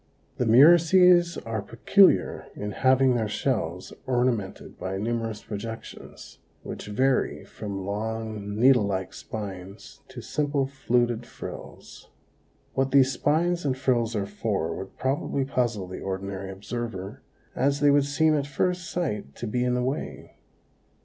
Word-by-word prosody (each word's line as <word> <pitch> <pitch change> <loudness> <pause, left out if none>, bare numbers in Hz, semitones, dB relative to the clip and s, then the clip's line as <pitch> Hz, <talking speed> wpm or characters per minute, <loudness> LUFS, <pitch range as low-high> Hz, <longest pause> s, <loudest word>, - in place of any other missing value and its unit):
The 125 - 0
murices 175 +7 +6
are 115 -2 -2
peculiar 120 - +3
in 105 0 -4
having 130 +3 +3
their 115 -3 0
shells 105 -7 -2
ornamented 120 -6 -1
by 95 +1 -3
numerous 115 0 -3
projections, 115 +2 -8 0.2
which - - -7
vary 130 +5 0
from 100 -3 -6
long, 110 0 -4
needle 120 -2 +5
like 95 -1 -3
spines 100 +2 -8
to 130 -1 -10
simple 145 +2 -1
fluted 120 -3 0
frills. - - -10 0.6
What 135 0 +1
these 135 -1 +5
spines 170 +7 +1
and 135 -3 0
frills 120 -4 0
are 100 -2 -1
for 100 -5 -2
would 95 0 -8
probably 135 0 -1
puzzle 120 -7 -1
the 90 +1 -8
ordinary 95 0 -4
observer, 105 +2 -6 0.3
as 140 +2 +1
they 145 0 +5
would 140 -1 +4
seem 155 +2 +2
at 140 -1 -1
first 175 +5 -1
sight 105 - -3
to 120 - -6
be 125 +3 -1
in 125 0 +1
the 125 - 0
way. 135 +5 -4
120 Hz, 135 wpm, -26 LUFS, 105-135 Hz, 0.6 s, murices